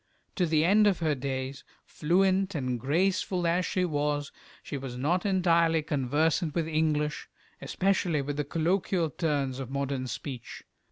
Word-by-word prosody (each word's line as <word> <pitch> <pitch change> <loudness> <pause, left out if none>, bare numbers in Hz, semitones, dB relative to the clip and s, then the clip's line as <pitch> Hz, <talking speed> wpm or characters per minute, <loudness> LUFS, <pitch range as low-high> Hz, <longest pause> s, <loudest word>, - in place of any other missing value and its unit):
To 180 -3 +1
the 155 0 +2
end 210 +4 +5
of 195 -4 +3
her 160 -3 +1
days, 135 0 -4 0.2
fluent 190 +3 +1
and 130 -4 -2
graceful 180 - 0
as 175 +2 +1
she 185 -1 0
was, 145 -2 -1 0.3
she - - -6
was 130 -3 -5
not 175 +9 0
entirely 170 -4 +3
conversant 150 +2 0
with 165 -2 0
English, 155 -2 0 0.3
especially 180 -6 0
with 145 +1 -4
the 150 - 0
colloquial 165 +2 0
turns 140 -4 -1
of 130 -2 -5
modern 135 -1 -2
speech. 125 -1 -7
155 Hz, 150 wpm, -28 LUFS, 140-175 Hz, 0.3 s, end